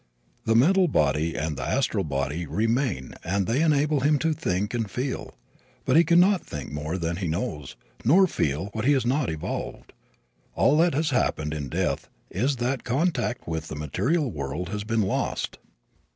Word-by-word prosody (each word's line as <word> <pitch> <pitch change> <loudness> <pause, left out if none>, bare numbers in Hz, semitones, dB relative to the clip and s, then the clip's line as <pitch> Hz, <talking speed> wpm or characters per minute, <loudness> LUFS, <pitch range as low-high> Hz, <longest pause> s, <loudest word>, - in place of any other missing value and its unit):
The 115 - +2
mental 180 +10 +5
body 75 - +1
and 75 0 -2
the - - -5
astral - - 0
body 70 +5 -2
remain 110 - -1
and 95 +2 0
they 120 - +1
enable 150 -2 +3
him 145 +3 +3
to 160 +3 +1
think 100 -6 -2
and 115 -4 -1
feel. 130 +6 -4 0.5
But - - +2
he 165 - +7
can 170 +1 +4
not 190 +1 +4
think 75 -1 -7
more 75 +4 -3
than 85 -1 -2
he 95 -2 -2
knows, 75 -5 -3 0.3
nor 175 +11 +6
feel 80 - -1
what 110 - -3
he 145 - +5
has 130 -3 +1
not 130 +2 +1
evolved. 80 -1 -5 0.6
All 145 - +4
that 170 -2 +3
has 155 +1 +1
happened 75 - 0
in 75 -3 -4
death - - -1 0.2
is 130 +9 0
that 125 +2 -2
contact 130 -2 -1
with 80 -1 -3
the - - -6
material 125 - 0
world 75 +3 -4
has 105 0 -3
been 110 0 +1
lost. 95 - -2
110 Hz, 180 wpm, -26 LUFS, -, 0.6 s, he